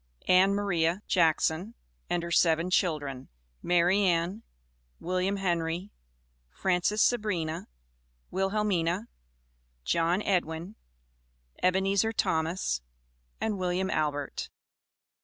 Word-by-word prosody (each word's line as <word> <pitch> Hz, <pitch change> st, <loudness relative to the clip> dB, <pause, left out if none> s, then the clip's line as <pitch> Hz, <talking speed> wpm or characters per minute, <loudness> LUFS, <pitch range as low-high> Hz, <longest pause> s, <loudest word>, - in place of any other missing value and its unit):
ANN 190 Hz, +2 st, +5 dB
MARIA 180 Hz, -2 st, 0 dB
JACKSON 170 Hz, +4 st, +1 dB, 0.3 s
AND 175 Hz, -1 st, 0 dB
HER 170 Hz, -, -5 dB
SEVEN 165 Hz, +1 st, +3 dB
CHILDREN 145 Hz, -8 st, 0 dB, 0.3 s
MARY 175 Hz, +2 st, +3 dB
ANN, 180 Hz, +3 st, +1 dB, 0.6 s
WILLIAM 185 Hz, +3 st, -1 dB
HENRY, 175 Hz, 0 st, -1 dB, 0.6 s
FRANCES 185 Hz, -, 0 dB
SABRINA, 185 Hz, -9 st, 0 dB, 0.6 s
WILHELMINA, 195 Hz, -1 st, 0 dB, 0.8 s
JOHN 170 Hz, -, +1 dB
EDWIN, 175 Hz, +1 st, -1 dB, 0.9 s
EBENEZER 195 Hz, +4 st, +2 dB
THOMAS, 160 Hz, -, 0 dB, 0.6 s
AND 210 Hz, -3 st, -2 dB
WILLIAM 185 Hz, +1 st, -1 dB
ALBERT. 145 Hz, -2 st, -2 dB
180 Hz, 85 wpm, -29 LUFS, 165-195 Hz, 0.9 s, ANN